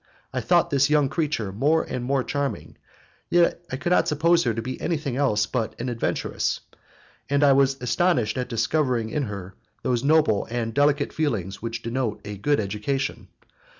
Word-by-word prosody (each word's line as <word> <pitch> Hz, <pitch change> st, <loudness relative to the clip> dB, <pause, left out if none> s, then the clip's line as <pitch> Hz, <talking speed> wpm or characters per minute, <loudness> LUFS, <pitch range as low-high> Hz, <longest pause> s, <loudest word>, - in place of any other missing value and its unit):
I -, -, -1 dB
thought -, -, +3 dB
this 140 Hz, 0 st, +3 dB
young 150 Hz, -3 st, +3 dB
creature 145 Hz, -, -1 dB
more 145 Hz, +11 st, +2 dB
and 125 Hz, -, -4 dB
more 135 Hz, +1 st, +1 dB
charming, 140 Hz, +1 st, -3 dB, 0.5 s
yet 175 Hz, 0 st, +3 dB
I -, -, -1 dB
could 170 Hz, +6 st, -2 dB
not -, -, +4 dB
suppose 170 Hz, +3 st, +3 dB
her 115 Hz, -, +1 dB
to -, -, -2 dB
be 130 Hz, +2 st, -5 dB
anything 150 Hz, -6 st, -2 dB
else 115 Hz, -7 st, +2 dB
but 115 Hz, 0 st, -3 dB
an 125 Hz, +1 st, -2 dB
adventuress, 115 Hz, -, -1 dB, 0.7 s
and 140 Hz, +1 st, +2 dB
I 140 Hz, -1 st, +6 dB
was 135 Hz, 0 st, +3 dB
astonished 125 Hz, -3 st, +1 dB
at 125 Hz, -1 st, -3 dB
discovering 120 Hz, -1 st, 0 dB
in 150 Hz, -, -1 dB
her 100 Hz, -3 st, -7 dB, 0.3 s
those 120 Hz, -1 st, 0 dB
noble 145 Hz, -8 st, +3 dB
and 115 Hz, -1 st, -2 dB
delicate 145 Hz, +2 st, +2 dB
feelings 110 Hz, -, -2 dB
which 115 Hz, +1 st, -4 dB
denote 115 Hz, -3 st, -2 dB
a 105 Hz, 0 st, -5 dB
good 145 Hz, +9 st, +1 dB
education. 110 Hz, +7 st, -2 dB
130 Hz, 175 wpm, -24 LUFS, 115-145 Hz, 0.7 s, I